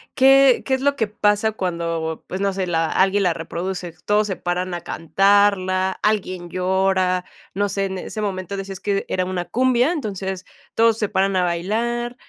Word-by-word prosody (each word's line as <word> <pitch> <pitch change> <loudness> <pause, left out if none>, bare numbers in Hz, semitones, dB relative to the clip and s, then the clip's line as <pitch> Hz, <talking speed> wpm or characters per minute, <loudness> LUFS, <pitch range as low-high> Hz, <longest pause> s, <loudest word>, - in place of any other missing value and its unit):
¿qué 270 -1 +6
qué 265 - 0
es 265 - +1
lo 285 0 +2
que 225 -5 0
pasa 210 +1 +1
cuando, 170 -5 -3
pues, 185 - -5
no 200 -1 +1
sé, 190 -1 -2
la 165 -2 +1
alguien 195 +1 +2
la 180 -3 +2
reproduce? 175 +1 -5
Todos 210 0 +2
se 190 - -2
paran 180 +1 -3
a 175 - -4
cantarla, 190 +1 +2
alguien 185 -4 -1
llora, 185 0 +1 0.3
no 205 +2 0
sé, 195 0 -1
en 190 -1 -4
ese 215 +4 -6
momento 195 -1 -3
decías 195 -1 -6
que 200 -1 -1
era 185 -1 -1
una 180 -1 -3
cumbia, 250 - +2
entonces 195 - -4 0.3
todos 230 -1 +4
se 210 -3 -1
paran 195 0 +1
a 185 - +2
bailar. 230 +8 -1
190 Hz, 180 wpm, -21 LUFS, 180-210 Hz, 0.3 s, qué